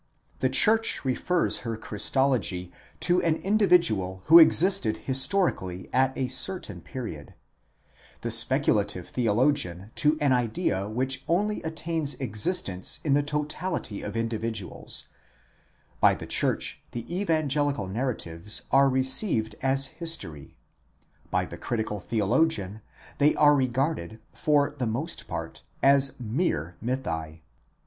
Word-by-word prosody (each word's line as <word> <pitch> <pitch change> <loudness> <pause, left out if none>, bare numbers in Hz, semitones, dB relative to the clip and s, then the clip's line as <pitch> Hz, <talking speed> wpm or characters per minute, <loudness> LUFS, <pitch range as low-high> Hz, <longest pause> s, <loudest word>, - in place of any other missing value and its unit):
The 130 - +1
church 220 +8 +2
refers 170 +7 0
her 115 -2 -5
Christology 105 -5 0 0.3
to 180 0 +2
an 165 -2 +1
individual 170 - +1
who 165 +2 +9
existed 160 - +4
histori 170 +9 +3
cally 95 0 -8
at 130 +1 +2
a 130 - -1
certain 155 +9 -2
period: 115 - -8 0.9
the - - -3
speculative - - +3
theologian 115 -4 0
to 155 +1 +3
an 145 -3 +2
idea 115 - -1
which 130 +4 -2
only 210 +5 0
attains 160 -2 -3
existence 105 - -2
in 145 -4 +1
the 145 - +3
totality 150 - -3
of 105 +2 -5
individuals; 115 -3 0 0.9
by - - +5
the - - -8
church - - -1
the 120 -1 -5 0.2
evangelical 145 - 0
narratives 105 -5 -2
are 135 +1 +5
received 130 - +1
as 135 +1 +1
history: 125 - -5 0.7
by - - 0
the - - -9
critical 110 -3 -3
theologian, 110 - 0 0.4
they 150 +1 +4
are 150 -1 +5
regarded 130 - -1
for 145 -1 +1
the 125 - -1
most 135 +10 -4
part - - -6 0.2
as 135 0 +4
mere 110 - -2
mythi. 80 -11 -4
130 Hz, 120 wpm, -26 LUFS, 110-155 Hz, 0.9 s, who